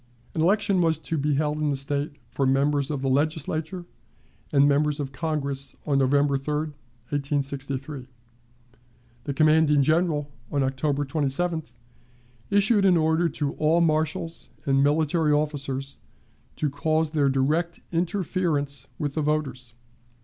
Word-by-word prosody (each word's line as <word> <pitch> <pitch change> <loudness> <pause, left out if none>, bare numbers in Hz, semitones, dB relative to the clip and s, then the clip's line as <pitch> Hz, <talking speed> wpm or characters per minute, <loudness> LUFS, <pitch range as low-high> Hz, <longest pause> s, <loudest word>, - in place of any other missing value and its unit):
An 160 - -1
election 195 +1 +3
was 165 -2 +2
to 160 +1 -4
be 145 -1 +1
held 150 +1 0
in 150 -1 +1
the 140 - 0
State 140 +2 -1 0.2
for 135 - 0
members 140 +1 +2
of 140 -3 -3
the - - 0
Legislature 155 +5 -1 0.7
and 140 -1 +5
members 150 +1 +2
of 140 -2 -3
Congress 140 -2 -2
on 140 -2 +2
November 140 +1 +3
3, 150 +2 -3 0.6
1863. 140 -1 -3 1.2
The 140 - -2
commanding 155 -1 +4
General, 155 -1 +1 0.2
on 140 -2 +1
October 140 +2 0
27th, 150 0 -1 0.8
issued 205 +1 +3
an 185 -3 +5
order 160 +1 +2
to 145 -1 -2
all 155 +2 +3
marshals 160 0 0 0.2
and 135 0 +3
military 155 +1 +2
officers 140 -2 -2 0.6
to 150 -3 -1
cause 155 +2 0
their 145 -3 +2
direct 155 +6 0
interference 165 -6 -1
with 145 -2 -2
the 155 - -1
voters. 135 -6 -2
150 Hz, 135 wpm, -25 LUFS, 140-160 Hz, 1.2 s, and